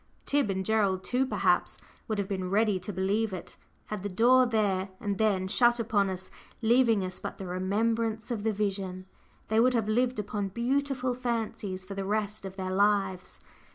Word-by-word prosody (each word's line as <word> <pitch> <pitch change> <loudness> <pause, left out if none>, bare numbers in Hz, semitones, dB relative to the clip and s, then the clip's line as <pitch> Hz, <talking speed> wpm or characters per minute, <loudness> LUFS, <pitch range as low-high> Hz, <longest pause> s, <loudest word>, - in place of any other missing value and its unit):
Tib 285 -6 +1
and 190 -1 -1
Gerald 200 -3 +1
too, 255 +1 0
perhaps - - +1 0.3
would 215 -3 -1
have 200 -1 -1
been 190 -2 -3
ready 205 -1 +2
to 185 +3 -6
believe 200 +3 0
it. 185 - -6 0.3
Had 210 -2 -5
the 205 - -3
door 245 +6 +5
there 200 -4 0
and 200 -2 -3
then 200 -4 +2
shut 240 +4 +4
upon 205 -3 +1
us, 185 0 -6 0.3
leaving 230 -3 +3
us 185 0 -5
but - - -6
the 195 - -6
remembrance 220 +5 -1
of 225 -3 -2
the 220 +1 +1
vision, 195 -3 -3 0.4
they 220 +1 +3
would 250 +2 +4
have 225 -3 +1
lived 245 +3 +1
upon 205 -1 -2
beautiful 255 +4 -1
fancies 225 -6 -3
for 200 - -7
the 195 0 -3
rest 210 0 -2
of 190 0 -7
their 185 -1 -4
lives. 195 -2 +1
210 Hz, 185 wpm, -29 LUFS, 190-230 Hz, 0.4 s, door